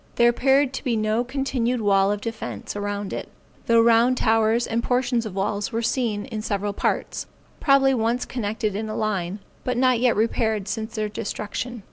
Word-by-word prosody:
There 235 Hz, 0 st, +5 dB
appeared 270 Hz, +2 st, +3 dB
to -, -, -5 dB
be 245 Hz, -5 st, 0 dB
no 215 Hz, +2 st, +1 dB
continued 255 Hz, -2 st, -1 dB
wall 200 Hz, -2 st, +3 dB
of 205 Hz, 0 st, -2 dB
defence 215 Hz, -, -5 dB
around 205 Hz, -1 st, -3 dB
it, -, -, -5 dB, 0.4 s
though 230 Hz, 0 st, +5 dB
round 235 Hz, +2 st, +4 dB
towers 225 Hz, +1 st, +2 dB
and 230 Hz, +1 st, -1 dB
portions 245 Hz, -2 st, +1 dB
of 195 Hz, -, -8 dB
walls 205 Hz, +4 st, -1 dB
were 230 Hz, 0 st, -2 dB
seen 225 Hz, -4 st, 0 dB
in 225 Hz, -5 st, -5 dB
several 205 Hz, -1 st, -2 dB
parts, -, -, -2 dB, 0.3 s
probably 275 Hz, -1 st, +4 dB
once 235 Hz, +1 st, 0 dB
connected 215 Hz, -3 st, -2 dB
in 220 Hz, +2 st, -3 dB
line, 205 Hz, -3 st, -2 dB, 0.2 s
but 250 Hz, -1 st, -1 dB
not 255 Hz, -1 st, +3 dB
yet 245 Hz, -1 st, +3 dB
repaired 220 Hz, -2 st, 0 dB
since 220 Hz, +3 st, -4 dB
their 215 Hz, -1 st, -1 dB
destruction. 215 Hz, +3 st, -4 dB
225 Hz, 175 wpm, -24 LUFS, 210-245 Hz, 0.4 s, There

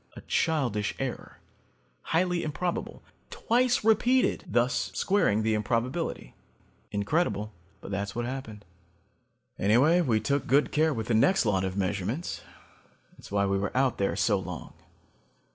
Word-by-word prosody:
A -, -, -9 dB
childish 125 Hz, -11 st, 0 dB
error, -, -, -5 dB, 0.6 s
highly 175 Hz, +1 st, 0 dB
improbable; 170 Hz, +3 st, -3 dB, 0.3 s
twice 245 Hz, 0 st, +1 dB
repeated, 240 Hz, +4 st, +3 dB
thus 120 Hz, +3 st, +1 dB
squaring 110 Hz, -, +2 dB
the 110 Hz, 0 st, +1 dB
improbability. 120 Hz, -, -2 dB, 0.6 s
Incredible, 105 Hz, -, -1 dB, 0.3 s
but -, -, -9 dB
that's 100 Hz, 0 st, -3 dB
what 120 Hz, 0 st, -2 dB
happened. 120 Hz, -6 st, -6 dB, 0.9 s
"Anyway, 130 Hz, -, +4 dB
we 120 Hz, -9 st, +2 dB
took 140 Hz, +4 st, -1 dB
good 140 Hz, +4 st, +3 dB
care 155 Hz, +1 st, +2 dB
with 115 Hz, -6 st, -3 dB
the 115 Hz, -, -1 dB
next 185 Hz, -, +3 dB
lot 95 Hz, -3 st, +1 dB
of 95 Hz, 0 st, -3 dB
measurements. 100 Hz, -, -2 dB, 0.7 s
That's -, -, -14 dB
why 100 Hz, 0 st, +2 dB
we 100 Hz, 0 st, 0 dB
were 100 Hz, +5 st, -3 dB
out 130 Hz, -1 st, +1 dB
there 100 Hz, -, 0 dB
so 100 Hz, -, +2 dB
long. 90 Hz, -3 st, -7 dB
120 Hz, 135 wpm, -28 LUFS, 100-160 Hz, 0.9 s, Anyway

